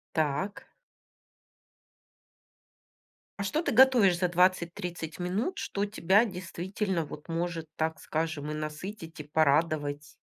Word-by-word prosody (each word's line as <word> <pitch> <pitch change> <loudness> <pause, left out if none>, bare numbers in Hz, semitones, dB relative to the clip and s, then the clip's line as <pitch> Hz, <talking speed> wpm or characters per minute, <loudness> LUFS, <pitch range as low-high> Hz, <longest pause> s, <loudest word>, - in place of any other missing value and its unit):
Так. 160 +6 -1 2.7
А - - +1
что 300 - 0
ты - - -1
готовишь 235 -7 +6
за 180 0 +2
20-30 175 -2 0
минут, 200 - -1
что 200 +1 -2
тебя 205 +2 +3
действительно 185 -1 -3
вот 150 +2 -10
может, 165 -1 -2
так 160 0 -1
скажем, 155 -2 -3
и - - -3
насытить, 160 +3 -6
и 150 - -5
порадовать? 150 -1 +1
175 Hz, 110 wpm, -29 LUFS, 155-195 Hz, 2.7 s, готовишь